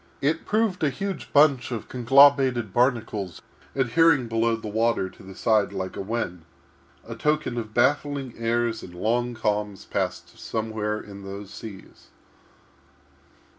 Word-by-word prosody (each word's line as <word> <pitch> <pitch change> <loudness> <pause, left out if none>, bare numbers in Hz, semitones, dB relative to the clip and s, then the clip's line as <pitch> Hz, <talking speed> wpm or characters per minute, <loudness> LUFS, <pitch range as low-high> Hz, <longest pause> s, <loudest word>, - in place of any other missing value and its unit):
It 155 +4 0
proved 215 -5 +1
a 150 - +4
huge 190 +6 -5
bunch 140 -4 +4
of 115 -3 -4
conglobated 130 -3 +4
barnacles 110 - 0 0.4
adhering 135 +1 +3
below 115 0 +1
the 115 -1 -7
water 110 -3 0
to - - -17
the 95 0 -11
side 110 -1 +2
like 95 -1 -4
a - - -4
wen—a 90 -6 -7
token 150 -4 0
of 110 -3 -5
baffling 140 0 +1
airs 115 -1 0
and 90 - -11
long 120 +6 0
calms 105 -2 -2
passed - - -3
somewhere 110 -1 -2
in 100 -2 -10
those 100 +1 -8
seas. 105 -4 -11
115 Hz, 135 wpm, -25 LUFS, 105-135 Hz, 0.4 s, a